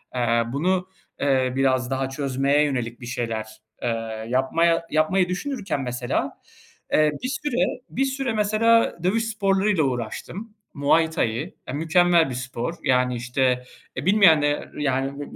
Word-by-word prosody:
eee, 120 -1 +2
bunu, 180 +5 0 0.3
eee, 130 -2 +1
biraz 130 -1 +1
daha 135 0 -1
çözmeye 140 +1 +1
yönelik 125 -5 -2
bir - - -7
şeyler, 115 -2 -3 0.4
eee, 115 -2 -3
yapmaya 165 +7 +2
yapmayı 175 +4 +2
düşünürken, 200 - -3
mesela, 125 -1 -2 0.6
eee, 155 -1 +4
bir - - 0
süre 255 -1 -1
bir 270 - 0
süre 270 -3 -2
mesela 220 +1 +3
dövüş 220 +5 +1
sporları 200 -2 +1
ile 175 - +2
uğraştım. 135 - -4 0.2
Muay 160 +3 +3
Thai, 130 +2 -2
ya, 130 - -5
mükemmel 165 +1 +3
bir 125 - -4
spor, 125 +4 -4
yani, 125 -1 +2
işte, 125 +1 0 0.3
e, - - -3
bilmeyenler 160 -7 +4
yani, 135 -1 -1
b - - -8
145 Hz, 140 wpm, -24 LUFS, 125-185 Hz, 0.6 s, eee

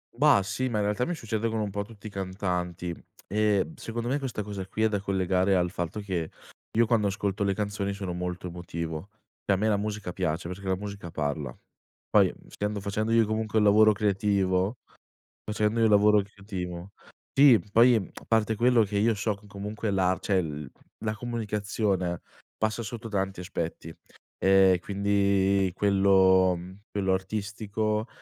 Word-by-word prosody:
Bah 100 - +5
sì, 130 +6 -2
ma 115 - -1
in 105 - +1
realtà 105 +4 0
mi 175 - -2
succede 115 -4 -2
con 110 - -2
un 105 -2 -2
po' 100 +1 -2
tutti 105 0 -16
i - - -4
cantanti 90 -2 -3 0.3
e 105 - +1
secondo 115 -2 -5
me 135 +4 0
questa 125 -6 -4
cosa 100 -2 -6
qui 110 - -2
è 110 - +5
da 105 -2 -1
collegare 95 0 +1
al 90 -1 +1
fatto 90 +3 -4
che 90 -5 -3 0.5
io 115 - +5
quando 110 -2 +2
ascolto 100 +1 -1
le 100 -1 +1
canzoni 100 -1 -2
sono 95 -3 -4
molto 90 0 -4
emotivo, 85 0 -5 0.3
e 100 - +2
a - - +3
me 105 +3 0
la 105 -2 +3
musica 105 -3 -4
piace, 85 -2 -2
perché 95 +2 -7
la 95 - +2
musica 100 -2 -7
parla. 75 -4 -3 0.6
Poi - - +5
essendo 105 0 -3
facendo 105 +3 -2
io 115 -1 +5
comunque 110 0 -1
un 110 - +4
lavoro 110 +1 +6
creativo 100 0 +1 0.7
facendo 105 +1 0
io - - +4
un - - +3
lavoro 105 +1 +6
creativo 95 -3 -7 0.4
Sì, 135 -5 +7
poi 120 +3 +6
a 100 -5 -5
parte 110 -1 +2
quello 120 +1 +4
che 100 0 -2
io 110 +2 +3
so 105 +1 -1
che 105 - -19
comunque 105 +2 -4
la 95 -1 +2
cioè 95 -2 +1
il 75 -5 -4 0.3
la 110 0 0
comunicazione 105 -5 -2 0.4
passa 110 +2 0
sotto 115 +1 -6
tanti 95 -3 -2
aspetti 85 -2 -5 0.5
e 95 -1 +5
quindi 100 -1 +2
quello, 95 -2 +4
mhmm, 90 +3 -10
quello 95 -2 0
artistico, 105 +3 -2
100 Hz, 170 wpm, -27 LUFS, 95-110 Hz, 0.7 s, Sì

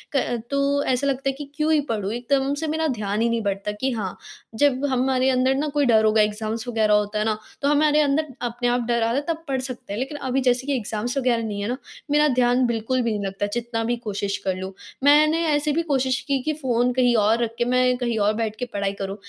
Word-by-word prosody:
क 245 -3 0
तो 280 0 +1
ऐसा 260 +2 0
लगता 275 0 0
है - - -1
कि 280 +1 -9
क्यों 305 +1 +1
ही 310 - +4
पढ़ूँ? 210 -3 -1
एकदम 270 +3 0
से 315 +2 -3
मेरा 320 +1 0
ध्यान 210 -5 -2
ही 235 - +2
नहीं 230 0 0
बढ़ता 200 0 -2
कि 265 - +1
हाँ 215 -6 -2 0.5
जब 285 -1 +3
हमारे 260 0 +2
अंदर 260 0 +2
ना 290 +3 -1
कोई 290 -1 +2
डर 220 -3 +4
होगा 215 0 +4
एग्ज़ाम्स 215 +2 -2
वग़ैरह 220 -3 +2
होता 210 0 +1
है 210 - 0
ना, 215 -1 0 0.2
तो 280 - +1
हमारे 295 +1 +3
अंदर 295 +2 +1 0.2
अपने 245 0 -2
आप 245 0 +1
डर 235 -1 +1
आता 230 +1 +1
है 280 - +1
तब 330 -1 -2
पढ़ 270 -1 -1
सकते 255 -5 -7
हैं, 210 - -3
लेकिन 270 +3 -4
अभी 265 -1 -1
जैसे 255 +1 +1
कि 285 - +1
एग्ज़ाम्स 230 +2 -3
वग़ैरह 245 -3 +1
नहीं 205 -2 -4
है 200 - -2
ना, 250 +2 -2 0.3
मेरा 300 +1 +4
ध्यान 250 -1 +3
बिल्कुल 235 +2 -1
भी 235 -1 0
नहीं 205 -2 -2
लगता 195 +1 -2
जितना 235 -1 -2
भी 240 +2 0
कोशिश 200 -3 -3
कर 190 -1 0
लूँ। 190 +1 -6 0.3
मैंने 305 +3 +5
ऐसे 295 0 +1
भी 320 +3 +1
कोशिश 260 -1 +1
की 275 -1 +1
कि 310 - 0
फ़ोन 250 -4 0
कहीं 245 -1 +3
और 220 +2 +3
रख 230 - -2
के 240 - +1
मैं 250 0 +3
कहीं 240 -2 -1
और 205 +1 +2
बैठ 220 -1 -2
के 250 - -1
पढ़ाई 200 -1 -1
करूँ, 195 0 -3
245 Hz, 250 wpm, -23 LUFS, 220-275 Hz, 0.5 s, मैंने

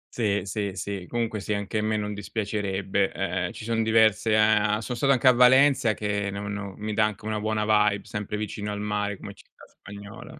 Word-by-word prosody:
Sì, 105 -4 0
sì, 100 0 -3
sì. 100 -1 -5
Comunque, 115 -2 -2
sì, 105 +2 -3
anche 100 +1 -3
a - - 0
me 110 0 0
non 105 0 -3
dispiacerebbe, 100 -2 -2
ehm, 90 -2 -2
ci - - -10
son 115 0 0
diverse, 110 -1 +3
uhm 105 -1 +3
sono 115 +3 -5
stato 135 +3 +2
anche 130 -1 +3
a - - +10
Valencia, 125 -2 +5
che 100 -1 -2
no 100 +1 -5
no 100 -1 -5
mi 105 0 -4
dà 110 +1 +3
anche 105 0 -5
una 110 0 -2
buona 110 0 -1 0.3
vibe, 105 0 -5
sempre 105 0 -4
vicino 105 0 -4
al 105 - -4
mare 105 -1 -2
come 100 - -9
città - - -21
spagnola. 100 +9 -12
105 Hz, 210 wpm, -25 LUFS, 100-110 Hz, 0.3 s, a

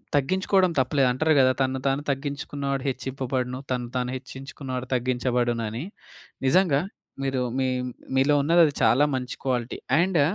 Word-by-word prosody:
తగ్గించుకోడం 185 +5 +2
తప్పులేదు 130 0 +2
అంటరు 155 +5 +2
కదా! 130 -1 +5
తనను 130 0 0
తాను 135 +1 +1
తగ్గించుకున్నవాడు 140 -1 -3
హెచ్చింపబడును. 130 -1 -3
తనను 125 -1 -2
తాను 125 0 -1
హెచ్చించుకున్నవాడు 130 -1 -7
తగ్గించబడునని. 120 -1 -1 0.6
నిజంగా, 155 -2 +4 0.4
మీరు 135 -1 0 0.2
మీ 130 - +1 0.5
మీలో 135 +3 +4
ఉన్నది 170 +4 +5
అది, 145 - 0
చాలా 135 +5 +5
మంచి 125 -1 -4
క్వాలిటీ. 125 -2 -1 0.2
అండ్ 175 -4 +3
130 Hz, 130 wpm, -25 LUFS, 125-145 Hz, 0.6 s, కదా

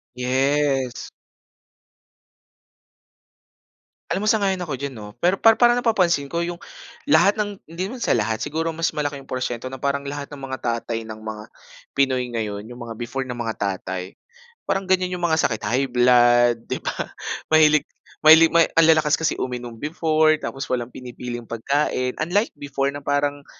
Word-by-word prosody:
Yes. 130 0 0 3.0
Alam 210 +2 -1
mo - - +3
sang-ayon 200 -3 +1
ako 170 -6 -4
diyan 140 +2 -4
'no, 105 -4 -10
pero 185 +2 +3
para 225 0 +6
parang 240 +1 +4
napapansin 180 -11 +2
ko 170 +4 -2
yung 175 0 -4 0.5
lahat 210 -7 +4
ng 205 -2 -3
hindi 180 +3 -3
naman 240 +4 -7
sa - - 0
lahat, 110 -1 +1
siguro 165 +2 -2
mas 165 +1 0
malaki 145 -2 -3
yung 135 - -19
porsiyento 130 0 -3
na 130 - -7
parang 140 +1 -1
lahat 140 0 -5
ng 140 - -11
mga 130 - -3
tatay 115 -1 -2
ng 110 0 -8
mga 110 -1 -6 0.5
Pinoy 130 -2 +1
ngayon, 105 -2 -3
yung 120 +1 -10
mga 115 -1 -8
before 120 +3 -3
na 125 -2 -6
mga 115 -2 -2
tatay, 95 -1 -4 0.5
parang 195 -1 -2
ganyan 185 -1 +2
yung 180 - -6
mga 160 -2 +2
sakit, 110 -3 -4
high 125 +6 +1
blood, 120 -1 +4
'di - - -4
ba? - - -1 0.6
Mahilig 155 -1 +5 0.4
mahilig 160 +1 +9
ma 170 0 +5
ang 165 -1 +5
lalakas 155 -2 +4
kasi 160 - 0
uminom 120 -2 -5
before, 155 +2 +2
tapos 135 +1 -4
walang 125 -1 -2
pinipiling 120 -1 -7
pagkain. 125 +2 -1
Unlike 185 +8 +1
before 140 -1 -1
na 145 - -7
parang, 145 0 0
140 Hz, 165 wpm, -22 LUFS, 120-165 Hz, 3.0 s, mahilig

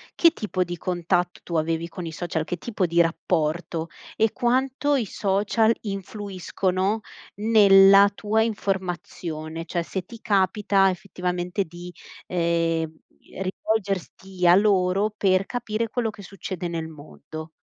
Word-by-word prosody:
che 335 -1 +6
tipo 185 - -2
di 175 - -5
contatto 175 0 -1
tu 170 - -6
avevi 165 +1 0
con 175 0 -7
i 165 - -5
social, 160 -1 -3
che 175 +2 -4
tipo 200 -1 -2
di 170 0 +1
rapporto? 165 0 0 0.3
E 220 -1 +2
quanto 265 +3 +1
i 235 - -1
social 205 +4 +1
influiscono 195 0 -2 0.4
nella 200 -2 +7
tua 215 +2 0
informazione? 175 -6 -3
Cioè 170 +1 -2
se 185 +2 -4
ti 230 +4 -11
capita 195 -1 +2
effettivamente 180 0 -2
di, 175 +1 -10 0.4
ehm, 165 -2 0 0.5
rivolgerti 190 -2 -3
a 175 0 +8
loro 195 0 +3
per 190 -2 +2
capire 230 -1 -2
quello 230 -1 -1
che 205 - -10
succede 190 -2 -6
nel 165 -1 -4
mondo. 155 +1 -10
185 Hz, 130 wpm, -24 LUFS, 170-205 Hz, 0.5 s, a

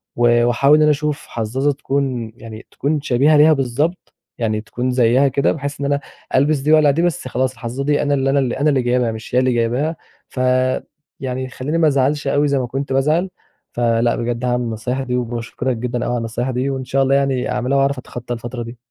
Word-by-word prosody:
و 120 0 +3
وأحاول 135 +5 +4
إن - - +3
أنا 150 0 +5
أشوف 150 0 -2
حظّاظة 125 +6 -1
تكون 135 -4 -2
يعني 110 -1 -11
تكون 150 +1 -1
شبيهة 145 +3 +3
ليها 155 +2 +6
بالضبط، 145 +6 -2 0.2
يعني 110 -2 -1
تكون 125 +3 -3
زيها 125 +2 +3
كده 135 +1 +1
بحيث 140 -1 -5
إن 140 - -2
أنا 140 0 +1 0.4
ألبس 145 +3 +3
دي 145 +3 0
وأقلع 150 -2 +5
دي 155 +4 0
بس 175 -4 -1
خلاص 130 +1 0
الحظّاظة 125 +1 -5
دي 145 +1 +1
أنا 145 - +1
اللي 135 -1 +1
أنا 140 +1 +3
أنا 135 +3 +1
اللي 135 -3 +2
جايبها 120 -1 +1
مش 110 +2 -7
هي - - +5
اللي 130 0 +2
جايبها؛ 120 +7 0 0.3
فيعني 130 +1 -2
يخليني 130 +4 -3
ما 160 -2 +4
ازعلش 140 +1 +1
أوي 145 +1 +2
زي 140 -1 +1
ما 125 - -2
كنت 135 +2 -3
بازعل. 155 +7 +1 0.4
فلأ 120 0 +1
بجد 120 +1 -2
هاعمل 125 0 0
النصايح 120 +3 -3
دي، 125 -1 -2
وباشكرك 120 +1 -3
جدًا 120 +1 -3
أوي 120 - -1
على 120 - 0
النصايح 115 +3 -3
دي، 130 +2 -1
وإن 130 -1 -3
شاء 135 +2 +1
الله 135 +1 +2
يعني 135 -2 0
أعملها 130 +3 0
وأعرف 140 0 +2
أتخطّى 120 -1 -6
الفترة 120 +1 -5
دي. 115 +1 -9
130 Hz, 210 wpm, -19 LUFS, 120-140 Hz, 0.4 s, ليها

